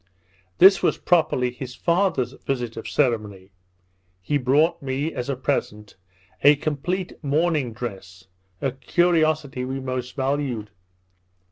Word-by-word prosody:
This 195 +2 +7
was - - +1
properly 145 -8 +2
his 125 0 -8
father's 170 -8 +1
visit 125 -4 -4
of 115 - -6
ceremony. 105 -8 -1 0.7
He 145 +11 -1
brought 150 +6 +2
me, 140 +3 -2
as 125 +2 -4
a 140 - 0
present, 105 -6 -3 0.5
a 145 +1 +8
complete 160 +6 -3
mourning 150 -3 +1
dress, 95 -5 -8 0.4
a 135 - 0
curiosity 155 -2 +1
we 130 +1 -3
most 130 -1 -4
valued. 130 -6 -2
135 Hz, 120 wpm, -23 LUFS, 120-155 Hz, 0.7 s, a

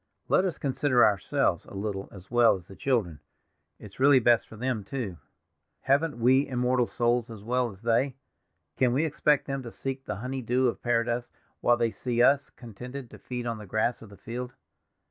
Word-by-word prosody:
Let 185 - +4
us 180 - -2
consider 130 -3 +3
ourselves 100 -2 +1
a - - -12
little 100 -1 -4
as 95 0 -13
well 120 -3 +5
as 90 -2 -11
the 95 - -12
children; 105 - 0 0.6
it's 105 +1 -13
really 140 +1 +6
best 120 -1 +4
for - - -12
them, 120 -1 -2
too. 100 -4 -5 0.6
Haven't 145 +2 +1
we 130 +4 +4
immortal 125 -1 +1
souls 120 0 0
as 110 -3 -9
well 125 +2 0
as 100 0 -14
they? 125 +3 +1 0.6
Can 125 -2 +3
we 145 +5 +2
expect 150 -1 +2
them 135 -1 -3
to 120 - -7
seek 135 +2 -5
the - - -3
honey 130 +6 -4
dew 125 +2 +2
of 120 - -2
paradise 120 0 0 0.3
while 120 0 +3
they 115 -1 +1
see 120 0 -3
us 140 +1 +4
contented 125 +2 -9
to 105 - -12
feed 125 +3 -5
on 115 -2 -3
the 105 - -10
grass 110 +4 0
of 110 - -12
the 100 - -14
field?" 125 +2 -6
120 Hz, 195 wpm, -28 LUFS, 110-130 Hz, 0.6 s, really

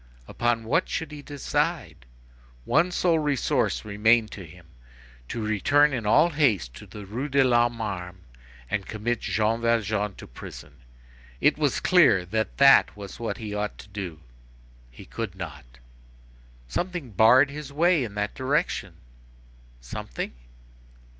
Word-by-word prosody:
Upon 120 -1 0
what 140 +11 0
should 160 -2 -3
he 150 -1 -8
decide? 140 - -3 0.6
One 175 - +3
sole 170 -2 +2
resource 145 -8 0
remained 110 +2 +2
to 100 - -8
him; 85 +1 -15 0.6
to 115 - -4
return 145 +8 +3
in 115 -5 -3
all 155 +10 +5
haste 115 - +1
to - - -12
the 105 -1 -10
Rue 120 +9 -4
de 135 0 +4
l'Homme 120 -2 +2
Armé, 95 -5 -5 0.5
and 100 +7 -3
commit 110 +2 -2
Jean 110 +2 0
Valjean 110 -3 0
to - - -11
prison. 70 +3 -11 0.6
It - - +3
was - - +1
clear 90 - +4
that 110 +4 -2
that 140 -5 +6
was 100 0 -9
what 115 - -3
he 110 -4 -6
ought 105 0 -3
to - - -13
do. 95 -6 -6 0.7
He - - -13
could 110 -5 -5
not. 70 -9 -9 0.9
Something 175 - -4
barred 125 +7 +5
his 145 -1 -8
way 165 +1 +3
in 105 -4 -6
that 105 0 -2
direction. 135 +3 -1 0.9
Something? - - -6
110 Hz, 140 wpm, -25 LUFS, 100-140 Hz, 0.9 s, that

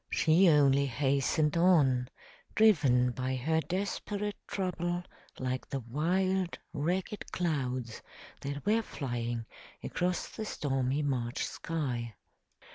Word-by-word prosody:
She 170 +3 +5
only 140 -2 +5
hastened 140 +3 +1
on, 145 -8 +4 0.5
driven 140 - +5
by 130 +2 -2
her 160 +6 +1
desperate 205 +3 -3
trouble 175 -2 -2 0.3
like 130 0 -3
the 135 - -3
wild, 180 +9 0 0.2
ragged 180 +7 -2
clouds 130 -9 -2 0.4
that 140 +2 -5
were 220 +2 +3
flying 120 - -3 0.4
across 180 0 -1
the 220 - -6
stormy 135 -4 -1
March 125 -3 -1
sky. 125 -9 -3
145 Hz, 105 wpm, -31 LUFS, 130-180 Hz, 0.5 s, She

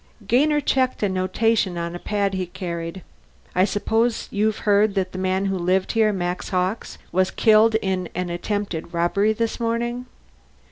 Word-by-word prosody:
Gainer 295 +8 +3
checked 260 -4 0
a 205 - +2
notation 190 +1 +1
on 170 0 -3
a 175 - -6
pad 200 0 -1
he 185 -1 -2
carried. 170 0 -5 0.5
"I 185 +1 +4
suppose 225 +3 0
you've 215 +1 +1
heard 205 0 +3
that 185 -1 -1
the 185 - -6
man 190 +1 0
who 195 -1 -1
lived 185 +2 +1
here 220 -2 +3
Max 180 -2 -3
Hawkes 185 +4 -2
was 185 +2 +2
killed 220 0 +4
in 185 -2 -1
an 180 0 -2
attempted 175 -2 -3
robbery 200 +5 +2
this 230 +2 -2
morning." 240 +2 -2
195 Hz, 160 wpm, -23 LUFS, 180-220 Hz, 0.5 s, I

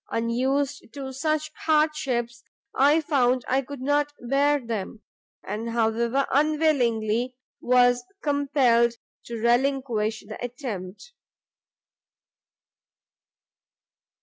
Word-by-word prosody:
unused 260 +5 -1
to 270 -1 -7
such 310 +2 -1 0.2
hardships, 275 -7 +1 0.3
I 290 +4 +4
found 255 -5 +1
I 265 +2 +2
could 275 0 -9
not 290 +2 +1
bear 280 +4 +2
them, 225 -3 -5 0.4
and, 215 +4 -4
however 235 +3 +1
unwillingly, 255 -6 +1 0.3
was 245 0 +4 0.2
compelled 270 -5 +2 0.3
to 235 - -6
relinquish 235 -2 0
the 215 - -8
attempt." 240 - -7
255 Hz, 85 wpm, -25 LUFS, 235-285 Hz, 0.4 s, I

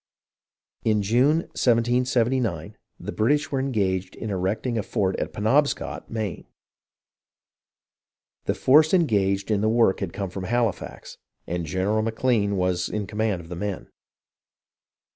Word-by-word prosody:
In 105 -2 +2
June, 130 +10 +3
1779, 120 -5 +1 0.2
the - - -5
British 145 +7 +1
were 135 - 0
engaged 95 -8 -1
in 110 - -5
erecting 100 +6 -1
a - - +1
fort 95 -2 -1
at - - -3
Penobscot 135 +8 0
(Castine), - - -21
Maine. 110 -5 -4 2.0
The - - 0
force 155 +6 +5
engaged 100 - +1
in 100 -1 +2
the 110 - +2
work 115 -4 +3
had 95 -4 -3
come 100 -1 -4
from 95 0 -5
Halifax, 115 -1 -2 0.3
and 85 -1 -3
General 95 +5 0
McLean 110 -2 +1
was 90 -1 0
in 105 -1 -3
command 105 -2 -1
of 80 - -14
the 90 - -5
men. 100 +2 -5
110 Hz, 135 wpm, -24 LUFS, 95-120 Hz, 2.0 s, force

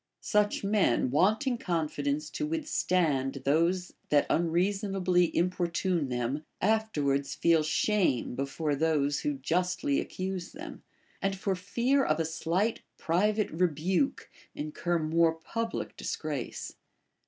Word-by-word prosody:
Such 210 -1 +1
men, 195 - +2
wanting 220 - +2
confidence 150 -4 -1
to 305 - -2
withstand 170 - 0
those 170 +5 +1 0.2
that 145 -1 +4
unreasonably 180 +2 +2
importune 175 -3 0
them, 125 +4 -2 0.2
afterwards 155 -10 +1
feel 165 -2 +4
shame 155 - +1
before 140 +3 -1
those 145 -2 +1
who 145 - -1
justly 175 +1 0
accuse 185 0 -4
them, 315 +5 -9 0.4
and 195 0 0
for 195 0 -1
fear 240 +9 +1
of 155 -6 +1
a 165 - +1
slight 170 +8 -1 0.2
private 210 +5 +1
rebuke 180 - 0 0.2
incur 155 +3 -1
more 165 +1 +2
public 230 +8 -4
disgrace. - - -4
175 Hz, 110 wpm, -29 LUFS, 150-195 Hz, 0.4 s, that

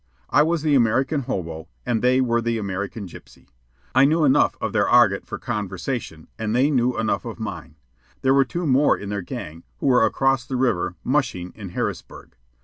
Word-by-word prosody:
I 145 - +5
was 160 0 +1
the 150 -2 +2
American 130 +4 +2
hobo, 80 -2 -4 0.2
and 120 -3 0
they 130 +1 +3
were 120 -2 +1
the 115 0 -1
American 100 +1 -4
gypsy. 65 -6 -15 0.5
I 130 - +5
knew 155 +3 +3
enough 135 - +3
of - - -3
their - - +2
argot 115 -5 +4
for - - -5
conversation, 100 -4 -4
and 110 0 -1
they 135 +4 +3
knew 125 -2 +1
enough 110 -1 0
of 115 -1 -7
mine. 85 -8 -6 0.5
There 135 0 +4
were 135 0 +5
two 170 +6 -4
more 140 0 +3
in 100 - -7
their 100 -1 -2
gang, 80 -2 -7 0.2
who - - -6
were 125 -4 +4
across 135 +2 +2
the 130 - -5
river 120 -9 0
"mushing" 125 -10 -1
in 100 -3 -9
Harrisburg. - - -5
120 Hz, 190 wpm, -23 LUFS, 100-135 Hz, 0.5 s, I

